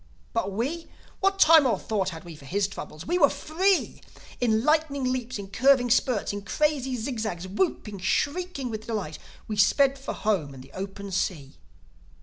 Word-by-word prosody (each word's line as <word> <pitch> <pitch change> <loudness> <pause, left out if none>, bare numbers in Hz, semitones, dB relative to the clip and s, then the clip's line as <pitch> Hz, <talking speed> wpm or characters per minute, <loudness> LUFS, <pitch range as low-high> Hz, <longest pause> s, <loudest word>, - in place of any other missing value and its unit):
"But 215 -4 -1
we?—What 330 - -3
time 320 -6 +7
or 225 -5 +2
thought 195 -3 -1
had 165 -1 -8
we 170 -2 -10
for 145 - -14
his 195 +6 0
troubles? 155 -5 -8
We 350 +3 0
were 285 -4 +6
free! 370 +5 0 0.4
In 220 -2 +2
lightning 300 -2 +2
leaps, 255 -1 -2
in 200 -1 -8
curving 245 +3 +4
spurts, 240 -4 +2
in 205 - -4
crazy 270 +2 0
zig 240 +1 -3
zags—whooping, 205 - -2
shrieking 285 - -1
with 220 0 -6
delight, 205 -9 -3 0.3
we 215 - -4
sped 275 +7 +4
for 270 - -5
home 165 -10 -1
and 130 - -10
the 135 - -17
open 195 +1 -6
sea! 155 -7 -3
225 Hz, 165 wpm, -26 LUFS, 195-280 Hz, 0.4 s, time